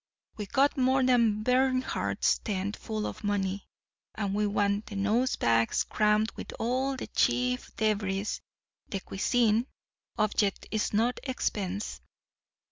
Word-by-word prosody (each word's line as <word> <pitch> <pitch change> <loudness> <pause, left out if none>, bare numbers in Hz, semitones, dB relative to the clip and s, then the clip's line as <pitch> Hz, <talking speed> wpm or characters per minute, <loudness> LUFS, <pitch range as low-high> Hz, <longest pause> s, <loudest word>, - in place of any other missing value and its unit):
We've 205 -3 -6
got 280 +2 +3
more 260 +1 +3
than 230 -4 +3
Bernhardt's 255 +1 +1
tent 200 0 -3
full 215 -1 -4
of - - -6
money; 200 -1 -1 0.5
and 200 -2 -2
we 210 +1 +1
want 205 0 0
the 205 - -7
nose 215 +6 +1
bags 115 0 +2
crammed 215 0 +2
with - - -8
all 260 +3 0
the - - -5
Chief 125 +1 +1
Deveries 205 -2 -1 0.5
de 195 - -2
cuisine. 225 +4 +1 0.5
Object 210 -2 +1
is 215 -1 0
no 225 +4 +2
expense. 205 -6 -3
210 Hz, 125 wpm, -29 LUFS, 200-245 Hz, 0.5 s, got